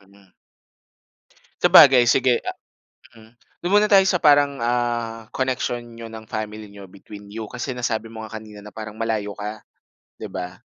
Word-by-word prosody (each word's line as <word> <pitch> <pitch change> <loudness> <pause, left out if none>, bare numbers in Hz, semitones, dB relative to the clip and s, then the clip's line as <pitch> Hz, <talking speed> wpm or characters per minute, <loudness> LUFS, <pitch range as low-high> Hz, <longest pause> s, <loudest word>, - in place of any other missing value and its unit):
Mm. 100 -1 -23 1.3
Sabagay, 130 -3 +8
sige, 125 0 +3
ah - - -4 0.6
mm. 110 +1 -18 0.3
Dun 185 - 0
muna 210 +1 +4
tayo 195 -2 +6
sa 180 -2 +1
parang, 145 -3 +4
ah, 120 -1 -2
connection 130 -2 -2 0.2
niyo 115 - -8
ng 110 -1 -11
family 110 -1 -6
niyo 100 -1 -12
between 100 +2 -13
you, 110 -1 -6
kasi 125 +1 -5
nasabi 115 -2 -3
mo 110 - -8
nga 110 0 -7
kanina 105 -1 -12
na 105 - -11
parang 110 0 -8
malayo 110 -2 -3
ka, 105 +1 -7 0.5
'di - - -9
ba? 90 -1 -7
115 Hz, 160 wpm, -22 LUFS, 105-125 Hz, 1.3 s, Sabagay